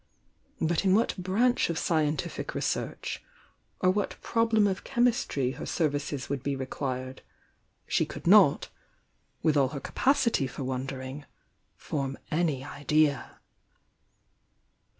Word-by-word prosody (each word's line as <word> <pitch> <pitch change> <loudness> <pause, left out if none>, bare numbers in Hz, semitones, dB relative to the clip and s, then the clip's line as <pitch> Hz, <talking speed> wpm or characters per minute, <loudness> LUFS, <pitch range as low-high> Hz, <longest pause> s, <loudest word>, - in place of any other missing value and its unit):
But 165 +2 +1
in 190 -1 +4
what 225 - +2
branch 210 +7 +1
of 170 - -1
scientific 155 -4 -1
research, - - -2 0.6
or 185 - +5
what 205 +2 -2
problem 225 -2 +3
of 195 -1 -1
chemistry 240 - +1
hor - - -7
services 145 -3 -1
would 140 -2 -3
be 140 0 -2
requiret^ 130 -1 -4 0.7
she - - +1
could - - -9
not, - - +6 0.7
with 155 -2 +3
all 140 -2 +4
her 140 +1 -5
capacity 235 - +1
for 130 - -6
wondering, 130 +2 -5 0.5
form 135 -2 -3
any 155 -5 0
idea. 145 0 0
150 Hz, 115 wpm, -28 LUFS, 135-190 Hz, 0.7 s, not